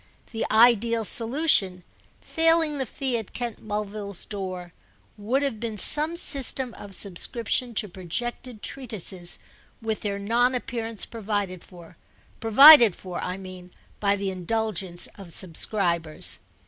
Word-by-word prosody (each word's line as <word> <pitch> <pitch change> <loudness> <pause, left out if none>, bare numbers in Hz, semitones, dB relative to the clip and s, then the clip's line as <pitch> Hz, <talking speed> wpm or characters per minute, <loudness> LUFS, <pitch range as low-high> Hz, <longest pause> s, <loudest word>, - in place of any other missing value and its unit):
The 225 -1 -3
ideal 230 0 +3
solution, 225 - +2 0.4
failing 325 -3 +1
the 265 - -3
fee 260 -4 -3
at 220 - -11
Kent 240 -2 -5
Mulville's 205 -2 -5
door, 185 -4 -7 0.4
would 235 +7 -1
have 265 -6 -3
been 225 -2 -5
some 305 - +5
system 270 -6 +1
of 200 -2 -9
subscription 230 +6 -2
to 210 - -1
projected 215 +6 -6
treatises 195 -9 -3 0.4
with 220 -2 -3
their 200 -1 -3
non 235 +5 +1
appearance 230 -3 -2
provided 205 -5 -4
for—provided 225 - +5
for, 180 -2 -7
I 180 +1 -4
mean, 185 -1 -11 0.3
by 200 -1 +1
the 195 -1 -3
indulgence 190 -1 -2
of 185 -4 -11
subscribers. 170 -2 -1
215 Hz, 120 wpm, -25 LUFS, 185-240 Hz, 0.4 s, some